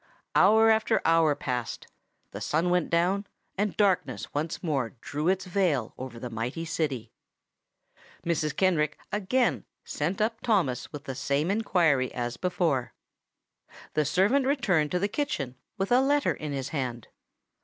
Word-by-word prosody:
Hour 220 Hz, +3 st, +6 dB
after 220 Hz, 0 st, +2 dB
hour 165 Hz, -2 st, +4 dB
passed; 125 Hz, -3 st, -4 dB, 0.5 s
the -, -, -7 dB
sun 165 Hz, +4 st, +1 dB
went 180 Hz, -2 st, +1 dB
down; 185 Hz, +4 st, +1 dB, 0.3 s
and 205 Hz, +1 st, -1 dB
darkness 200 Hz, -3 st, +1 dB
once 155 Hz, +5 st, -3 dB
more 140 Hz, -7 st, -1 dB
drew 150 Hz, +6 st, -3 dB
its 190 Hz, 0 st, +1 dB
veil 175 Hz, -, 0 dB
over 130 Hz, -2 st, -7 dB
the 120 Hz, +1 st, -6 dB
mighty 120 Hz, +9 st, -3 dB
city. 140 Hz, -8 st, -2 dB, 1.1 s
Mrs. 155 Hz, -3 st, 0 dB
Kenrick 155 Hz, -6 st, +2 dB
again 220 Hz, +5 st, +1 dB, 0.2 s
sent 165 Hz, +6 st, -2 dB
up 225 Hz, +1 st, 0 dB
Thomas 170 Hz, -, 0 dB
with 145 Hz, -1 st, -7 dB
the 135 Hz, -, -5 dB
same 140 Hz, +5 st, 0 dB
inquiry 170 Hz, -, +2 dB
as 120 Hz, 0 st, -2 dB
before. 170 Hz, -8 st, -1 dB, 1.0 s
The 155 Hz, -, +2 dB
servant 195 Hz, -, +2 dB
returned 200 Hz, -, +2 dB
to 180 Hz, -, 0 dB
the 195 Hz, +3 st, +1 dB
kitchen 165 Hz, -, -3 dB, 0.2 s
with 195 Hz, +2 st, -2 dB
a 250 Hz, +1 st, +6 dB
letter 285 Hz, +2 st, +2 dB
in 150 Hz, -2 st, -6 dB
his 135 Hz, -1 st, -3 dB
hand. 125 Hz, -6 st, -4 dB
165 Hz, 145 wpm, -28 LUFS, 140-195 Hz, 1.1 s, Hour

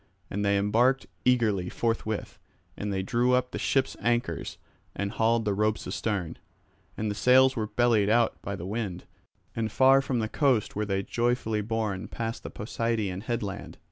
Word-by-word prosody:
And 100 Hz, +1 st, -2 dB
they 100 Hz, 0 st, +3 dB
embarked 120 Hz, +7 st, +2 dB, 0.2 s
eagerly 110 Hz, -8 st, +2 dB
forthwith; 110 Hz, -2 st, -2 dB, 0.4 s
and 105 Hz, 0 st, -4 dB
they 95 Hz, -1 st, -1 dB
drew 120 Hz, +5 st, +2 dB
up 125 Hz, 0 st, 0 dB
the -, -, -4 dB
ship's 135 Hz, -1 st, +1 dB
anchors 120 Hz, +1 st, -1 dB, 0.4 s
and 100 Hz, 0 st, -2 dB
hauled 115 Hz, 0 st, +1 dB
the 105 Hz, -, +1 dB
ropes 105 Hz, +2 st, 0 dB
astern. 95 Hz, -7 st, -3 dB, 0.6 s
And 105 Hz, -1 st, -1 dB
the -, -, -1 dB
sails 130 Hz, +5 st, +5 dB
were 110 Hz, -3 st, -1 dB
bellied 115 Hz, -3 st, +2 dB
out 115 Hz, +1 st, +2 dB
by 100 Hz, -, -4 dB
the 85 Hz, -, -7 dB
wind, 100 Hz, -3 st, -3 dB, 0.5 s
and 110 Hz, -2 st, -2 dB
far 135 Hz, +3 st, +5 dB
from 135 Hz, -2 st, -2 dB
the 110 Hz, -1 st, 0 dB
coast 130 Hz, -3 st, +1 dB
were 105 Hz, +1 st, -1 dB
they 95 Hz, -1 st, 0 dB
joyfully 115 Hz, -1 st, 0 dB
borne 110 Hz, -3 st, -2 dB
past 115 Hz, 0 st, -4 dB
the -, -, -7 dB
Posideian 105 Hz, -3 st, -2 dB
headland. 105 Hz, -5 st, -4 dB
110 Hz, 170 wpm, -27 LUFS, 100-120 Hz, 0.6 s, sails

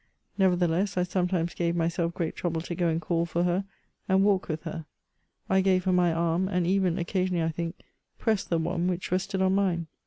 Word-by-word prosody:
Nevertheless, 185 Hz, 0 st, +2 dB
I 180 Hz, -, +3 dB
some 180 Hz, 0 st, 0 dB
times 175 Hz, -2 st, -1 dB
gave 170 Hz, -1 st, -1 dB
myself 170 Hz, 0 st, 0 dB
great 165 Hz, -3 st, -2 dB
trouble 165 Hz, -2 st, -2 dB
to 175 Hz, -, -5 dB
go 175 Hz, 0 st, 0 dB
and 165 Hz, 0 st, +1 dB
call 170 Hz, +1 st, -1 dB
for 170 Hz, +1 st, 0 dB
her 180 Hz, +2 st, +1 dB, 0.4 s
and 190 Hz, +1 st, +4 dB
walk 195 Hz, -2 st, +2 dB
with 155 Hz, -1 st, -4 dB
her; 160 Hz, -1 st, -6 dB, 0.6 s
I 190 Hz, 0 st, +3 dB
gave 185 Hz, -1 st, +2 dB
her 185 Hz, -, +1 dB
my 180 Hz, -1 st, +3 dB
arm, 170 Hz, +2 st, +1 dB
and 180 Hz, -2 st, 0 dB
even 185 Hz, -1 st, +2 dB
occasionally, 180 Hz, -1 st, 0 dB
I 160 Hz, -, +1 dB
think, 165 Hz, +1 st, -4 dB, 0.4 s
pressed 220 Hz, -4 st, 0 dB
the 170 Hz, -, +2 dB
one 170 Hz, +2 st, -1 dB
which 180 Hz, -1 st, -2 dB
rested 190 Hz, +1 st, 0 dB
on 190 Hz, 0 st, +3 dB
mine. 185 Hz, -4 st, +1 dB
175 Hz, 210 wpm, -27 LUFS, 170-190 Hz, 0.6 s, and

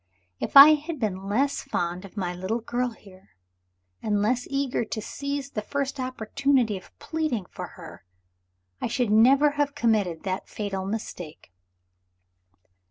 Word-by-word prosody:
If -, -, +2 dB
I 280 Hz, +2 st, +13 dB
had 305 Hz, 0 st, -3 dB
been 195 Hz, -4 st, -3 dB
less 270 Hz, +7 st, +1 dB
fond 175 Hz, +2 st, -3 dB
of 195 Hz, -, -14 dB
my 180 Hz, -3 st, -2 dB
little 185 Hz, +5 st, -2 dB
girl 245 Hz, +2 st, -1 dB
here, 195 Hz, -, -17 dB, 0.7 s
and 210 Hz, -1 st, 0 dB
less 245 Hz, +4 st, 0 dB
eager 275 Hz, -3 st, 0 dB
to 220 Hz, -, -4 dB
seize 280 Hz, +4 st, -4 dB
the 210 Hz, -, -3 dB
first 275 Hz, +4 st, -3 dB
opportunity 255 Hz, -1 st, 0 dB
of 185 Hz, -, -12 dB
pleading 310 Hz, -, -2 dB
for -, -, -6 dB
her, -, -, -11 dB, 0.8 s
I -, -, 0 dB
should 245 Hz, -5 st, 0 dB
never 270 Hz, +7 st, +6 dB
have 290 Hz, -1 st, -1 dB
committed 205 Hz, -8 st, +1 dB
that 190 Hz, 0 st, -3 dB
fatal 195 Hz, -2 st, -4 dB
mistake." 180 Hz, -, -6 dB
225 Hz, 145 wpm, -26 LUFS, 195-275 Hz, 0.8 s, I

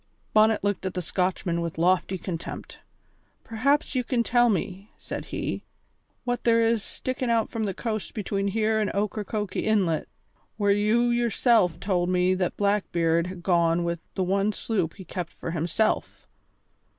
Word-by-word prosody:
Bonnet 215 Hz, 0 st, +4 dB
looked 205 Hz, -2 st, 0 dB
at 190 Hz, -, -3 dB
the 180 Hz, -, -1 dB
Scotchman 180 Hz, -1 st, -1 dB
with 170 Hz, -1 st, -4 dB
lofty 185 Hz, +2 st, +2 dB
contempt. 170 Hz, -2 st, -6 dB, 0.6 s
"Perhaps 275 Hz, +7 st, +1 dB
you 255 Hz, -2 st, +1 dB
can 240 Hz, -1 st, +1 dB
tell 240 Hz, 0 st, +4 dB
me," 195 Hz, 0 st, -2 dB
said -, -, -6 dB
he, -, -, -4 dB, 0.6 s
"what 245 Hz, -1 st, -2 dB
there 230 Hz, -1 st, +4 dB
is 225 Hz, -1 st, +2 dB
stickin' 255 Hz, +3 st, -4 dB
out 230 Hz, -1 st, +1 dB
from 225 Hz, -2 st, -2 dB
the 195 Hz, -, -2 dB
coast 220 Hz, -3 st, -4 dB
between 200 Hz, -2 st, -1 dB
here 220 Hz, +2 st, +1 dB
and 210 Hz, -, +1 dB
Ocracoke 210 Hz, -1 st, -2 dB
Inlet, 190 Hz, -7 st, +1 dB, 0.5 s
where 205 Hz, -2 st, +3 dB
you 215 Hz, +4 st, +3 dB
yourself 235 Hz, -6 st, +3 dB
told 180 Hz, -3 st, 0 dB
me 180 Hz, 0 st, +3 dB
that 185 Hz, -1 st, -1 dB
Blackbeard 170 Hz, -5 st, +1 dB
had 185 Hz, -1 st, -8 dB
gone 170 Hz, -1 st, +3 dB
with 170 Hz, 0 st, -2 dB, 0.2 s
the 190 Hz, -, +1 dB
one 195 Hz, +3 st, +1 dB
sloop 190 Hz, -9 st, -2 dB
he 190 Hz, -, -10 dB
kept 175 Hz, -3 st, -5 dB
for -, -, -6 dB
himself?" 170 Hz, +6 st, -1 dB
200 Hz, 160 wpm, -26 LUFS, 180-225 Hz, 0.6 s, Bonnet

